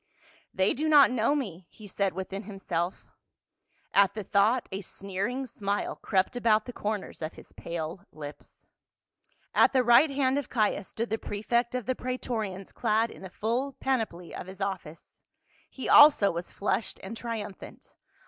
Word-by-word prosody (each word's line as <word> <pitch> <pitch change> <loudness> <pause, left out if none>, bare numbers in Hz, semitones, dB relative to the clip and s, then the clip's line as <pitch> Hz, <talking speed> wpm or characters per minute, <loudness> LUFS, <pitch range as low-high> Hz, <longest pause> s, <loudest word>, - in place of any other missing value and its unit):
"They 190 +1 +2
do 310 +4 -1
not 290 -4 +7
know 250 +3 +2
me," 190 - -4
he 215 - -14
said 195 0 -1
within 190 +2 -5
himself. 190 -3 -3 0.9
At 200 0 +4
the 215 - -4
thought 210 +6 +2
a 190 +1 -3
sneering 200 +7 -4
smile 205 -4 -2
crept 190 +3 0
about 220 -3 +3
the 245 - -7
cor 210 -1 -1
ners 190 - -10
of 155 - -4
his - - -14
pale 170 +1 -5
lips. 150 -1 -11 0.9
At - - +5
the 260 -1 +4
right 240 +6 +6
hand 275 0 +1
of 285 - -7
Caius 215 -4 0
stood 230 0 -4
the 220 - 0
prefect 235 +4 -1
of 250 -4 -2
the 260 - +1
praetorians 225 -7 -4
clad 225 0 +1
in - - -13
the 190 - -8
full 240 +8 -2
panoply 225 -12 -2
of - - -7
his 190 0 -10
office. 190 -5 -5 0.5
He 265 - -6
also 290 -9 +8
was 170 +1 -5
flushed 210 +2 -2
and 195 +4 -6
triumphant. 225 -4 -7
215 Hz, 165 wpm, -28 LUFS, 190-245 Hz, 0.9 s, also